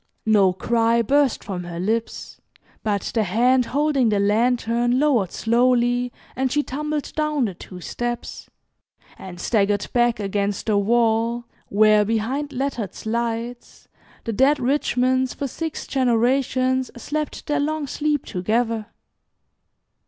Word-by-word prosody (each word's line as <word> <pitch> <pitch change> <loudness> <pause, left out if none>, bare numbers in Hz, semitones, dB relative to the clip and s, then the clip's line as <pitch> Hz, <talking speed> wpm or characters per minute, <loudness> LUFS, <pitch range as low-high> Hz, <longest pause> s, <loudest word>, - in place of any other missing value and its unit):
No 205 -4 +4
cry 230 +4 +1
burst 280 +2 +2
from 185 -3 -5
her 170 -1 -6
lips, 220 +5 -3 0.4
but 205 -3 -1
the 225 - +2
hand 245 +6 +2
holding 280 -4 +2
the 205 -1 +1
lantern 235 +3 +2
lowered 255 - +2
slowly, 245 +1 +2 0.2
and 260 0 0
she 295 +2 +1
tumbled 300 +2 -4
down 305 -4 +1
the 200 - -3
two 180 +1 -11
steps, 240 +5 -5 0.7
and 180 -2 -9
staggered 205 -1 +1
back 240 -2 +2
against 200 0 -2
the 215 - +1
wall, 230 +2 +1 0.2
where, 215 +1 +4
behind 230 +7 -1
lettered 245 -7 -3
slides, 235 +1 -4 0.4
the 230 - -3
dead 275 +6 +3
Richmonds 260 -1 +1
for 280 - -3
six 320 +4 -5
generations 255 +1 +1
slept 300 +5 -4
their 295 -1 0
long 305 +1 -1
sleep 295 +1 -1
together. 220 +3 -1
240 Hz, 125 wpm, -22 LUFS, 215-265 Hz, 0.7 s, No